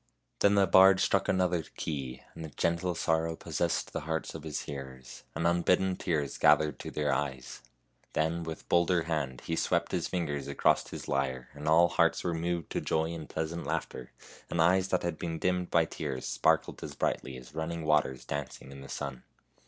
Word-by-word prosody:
Then 100 0 +4
the 100 -1 +5
bard 95 +2 +7
struck 95 0 +2
another 90 -2 +2 0.2
key, 70 -5 -4
and 80 - -8
a 80 - -6
gentle 85 +5 0
sorrow 80 0 0
pos - - -6
sessed - - 0
the - - -2
hearts 80 +1 -3
of 80 - -7
his 75 -1 -4
hearers, 65 -2 -8
and 85 - -1
unbidden 90 +2 +3
tears 75 -7 -2
gathered 75 -1 +4
to - - -6
their 75 -2 0
eyes. 65 -2 -3 0.5
Then, 80 +2 0
with 80 -1 -7
bolder 85 0 +3
hand, 75 -6 -2
he 80 - -2
swept - - 0
his - - -1
fingers 75 -6 -2
across 70 - +2
his - - -7
lyre, 65 -2 -1
and 75 +1 -7
all 85 +2 +6
hearts 85 - +2
were 85 - 0
moved 85 0 -2
to - - -1
joy 80 +1 0
and 80 -3 -7
pleasant 80 +2 -3
laughter, 60 - -4 0.4
and 85 - -2
eyes 90 +3 +4
that 90 - 0
had 85 -2 -2
been 85 -1 -3
dimmed 90 +1 0
by 85 -1 +4
tears 65 -4 -5
sparkled - - +1
as - - -6
brightly 65 - -2
as 65 +3 -13
running 80 +1 -3
waters 75 -4 +1
dancing 70 -1 -5
in 70 0 -10
the 70 - -11
sun. 70 -4 -5
80 Hz, 190 wpm, -30 LUFS, 70-85 Hz, 0.5 s, bard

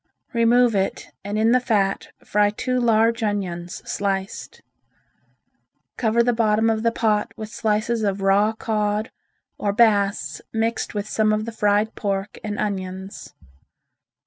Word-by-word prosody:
Remove 235 0 +4
it 195 -1 -2
and 205 +1 -3
in 220 +1 +3
the 255 - +5
fat 210 -6 0 0.2
fry 205 0 +3
two 255 +4 -2
large 230 0 +3
onions 185 -5 -3
sliced. 195 -1 -3 1.3
Cover 235 0 +2
the 245 0 +2
bottom 225 0 +2
of 220 -1 -1
the 230 0 +2
pot 215 -2 0
with 215 -1 -6
slices 220 +2 0
of 200 -2 -1
raw 200 +2 +4
cod 215 -1 -1 0.5
or 205 - 0
bass 200 - +2
mixed 225 0 -2
with 205 0 -2
some 215 0 +1
of 215 0 0
the 230 - -5
fried 210 0 +1
pork 200 -1 -3
and 210 -1 -4
onions. 190 -1 -5
215 Hz, 140 wpm, -22 LUFS, 200-225 Hz, 1.3 s, the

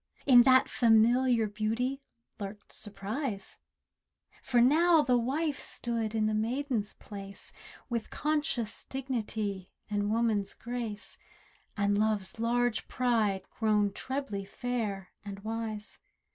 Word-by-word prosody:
In 250 -3 +9
that 260 +1 +6
familiar 235 +1 +4
beauty 225 +6 -1 0.4
lurked 205 0 -7
surprise: 210 +1 -4 0.8
For 245 -2 +2
now 315 +6 +5
the 250 -2 +3
wife 285 +5 -1
stood 230 -2 -2
in 215 -1 +2
the 215 - +1
maiden's 230 0 -1
place— 195 -1 -10 0.3
With 235 -3 -3
conscious 295 -7 -1
dignity, 220 -7 -3 0.2
and 205 0 0
woman's 215 -3 +1
grace, 235 -3 -4 0.6
And 205 0 +2
love's 215 -1 0
large 240 0 +1
pride 220 -6 +1
grown 210 -2 +2
trebly 260 -7 -3
fair 210 -3 -3
and 200 -1 -7
wise. 220 -1 -4
225 Hz, 110 wpm, -30 LUFS, 205-250 Hz, 0.8 s, In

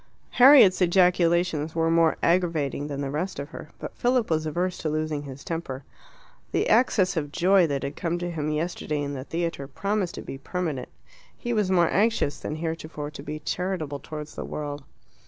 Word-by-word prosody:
Harriet's 250 -8 +7
ejaculations 175 -3 +3
were 165 0 +2
more 165 -1 +3
aggravating 165 -5 +1
than 140 -1 -4
the 135 -1 -3
rest 165 +6 -3
of 140 +1 -5
her. 160 - -9
But - - -8
Philip 245 -5 +1
was 155 0 +1
averse 175 +4 -2
to 155 - -2
losing 155 -1 -1
his 140 -1 -9
temper. 155 -5 -4 0.7
The - - +1
access 210 -5 +3
of 145 -3 -2
joy 180 +2 +4
that 140 -3 -2
had 140 - -4
come 170 0 -2
to 175 0 -3
him 155 -2 -2
yesterday 150 -1 -2
in 140 0 -3
the 130 -1 -6
theatre 165 -4 -3
promised 195 +5 -2
to - - -7
be 135 - -7
permanent. 155 -3 -3 0.5
He 240 -1 -3
was 210 -4 +1
more 175 -3 +3
anxious 205 -8 +1
than 150 - -4
heretofore 155 -2 -5
to 145 - -9
be 150 +1 -6
charitable 160 -4 -3
towards 155 0 -8
the - - -5
world. 145 -1 -5
165 Hz, 185 wpm, -26 LUFS, 145-180 Hz, 0.7 s, Harriet's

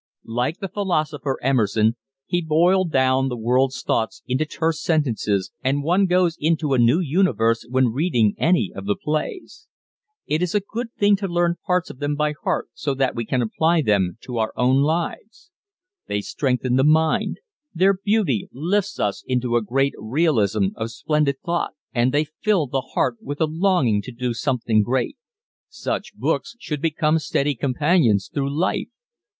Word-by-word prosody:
Like 125 +8 -2
the 195 - -4
philosopher 155 -8 -1
Emerson 110 -4 +2 0.3
he 175 - 0
boiled 170 +3 +2
down 130 0 +2
the 125 - -4
world's 125 +3 +1
thoughts 110 - -1
into 130 +5 -1
terse 160 -1 -1
sentences 115 - 0
and 140 +2 0
one 180 +5 +3
goes 180 -2 +2
into 155 -2 +1
a 130 - +3
new 120 +8 +4
universe 135 - +1
when 130 -1 +2
reading 125 - +2
any 165 - +2
of 95 0 -7
the 100 - +1
plays. 155 - -4 0.6
It 155 +2 0
is 180 +2 -1
a - - +5
good 225 +4 -6
thing 205 0 +4
to 195 0 -3
learn 175 -1 +1
parts 180 -1 +1
of 130 - -15
them 145 0 -1
by 150 0 0
heart - - -1
so 140 -2 -2
that 135 -1 +1
we 115 -1 -3
can 125 -2 +1
apply 160 +8 +1
them 100 -4 +1
to 125 -3 -5
our 110 -1 0
own 130 +2 +3
lives. 170 - -3 0.6
They 100 0 -1
strengthen 125 +2 -1
the 130 - +4
mind... 155 +1 +2 0.3
their 190 +3 +3
beauty 195 - 0
lifts 185 +9 -1
us 100 - -1
into 125 -2 0
a 120 - +3
great 135 +5 0
realism 110 - +1
of 110 0 -3
splendid 150 +3 0
thought... 170 0 -1 0.2
and 125 0 +2
they 145 +2 +2 0.2
fill 205 -8 +2
the 135 0 -2
heart 125 -1 -1
with 145 +1 -6
a 160 - +3
longing 155 - +1
to 130 - -9
do 125 0 -3
something 120 -4 +1
great. 130 - -1 0.5
Such - - -4
books 275 - -2
should 150 -10 -5
become 155 0 +1
steady 145 -1 0
companions 130 - +1
through 140 -1 -1
life. 165 +6 -1
145 Hz, 170 wpm, -22 LUFS, 120-170 Hz, 0.6 s, a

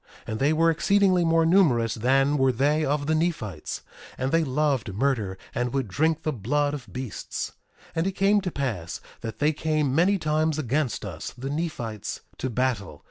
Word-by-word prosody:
And 110 0 -4
they 140 +3 +3
were 165 +1 +4
exceedingly 185 +2 +3
more 165 0 +3
numerous 145 - +4
than 135 +5 +2
were 135 0 +4
they 145 +6 +2
of 145 0 0
the 155 - +1
Nephites; 150 - -2 0.3
and 130 +1 -1
they 165 0 +3
loved 135 -7 0
murder 110 -6 0 0.2
and 125 0 -1
would 135 -4 0
drink 160 - +1
the 155 - 0
blood 145 +6 0
of 140 -4 -7
beasts. 125 -4 -5 0.4
1:7 - - -24
And 165 +3 +2
it - - +1
came 200 +2 +3
to 185 -2 -3
pass 110 - -3 0.2
that 115 -2 -6
they 150 +4 +2
came 155 -3 0
many 180 +7 +4
times 155 -1 +1
against 140 -4 -1
us, 85 +1 -6
the 135 +3 -4
Nephites, 135 - -4 0.2
to 130 - -1
battle. 115 - -1
145 Hz, 185 wpm, -26 LUFS, 120-160 Hz, 0.4 s, were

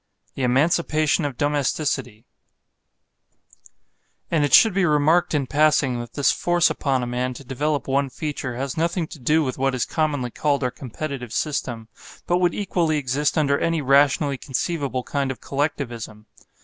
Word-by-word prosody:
THE - - -6
EMANCIPATION 155 +4 +2
OF 140 -4 -4
DOMESTICITY 145 -5 -1 2.1
And 160 -3 +2
it 145 - 0
should 220 - +7
be 195 0 +1
remarked 160 +2 +3
in 140 -2 +1
passing 145 -3 +2
that 120 -1 -8
this 145 - +3
force 175 -1 +2
upon 135 -3 -1
a - - -2
man 125 +1 -2
to 140 - -10
develop 140 +2 -2
one 135 +1 +1
feature 140 -3 -4
has 135 +1 -4
nothing 170 +1 0
to 155 0 -11
do 155 +5 +2
with 130 -2 -4
what 135 0 +1
is 125 - 0
commonly 145 -6 -1
called 145 0 0
our 125 - 0
competitive 130 -1 -6
system, 120 -6 -3 0.4
but 175 - +2
would 175 -1 +1
equally 170 -6 0
exist 145 +2 0
under 140 -2 +2
any 165 -1 0
rationally 140 0 +3
conceivable 140 -2 -2
kind 140 0 -2
of 130 - -5
Collectivism. 120 -7 -4
140 Hz, 160 wpm, -23 LUFS, 130-155 Hz, 2.1 s, should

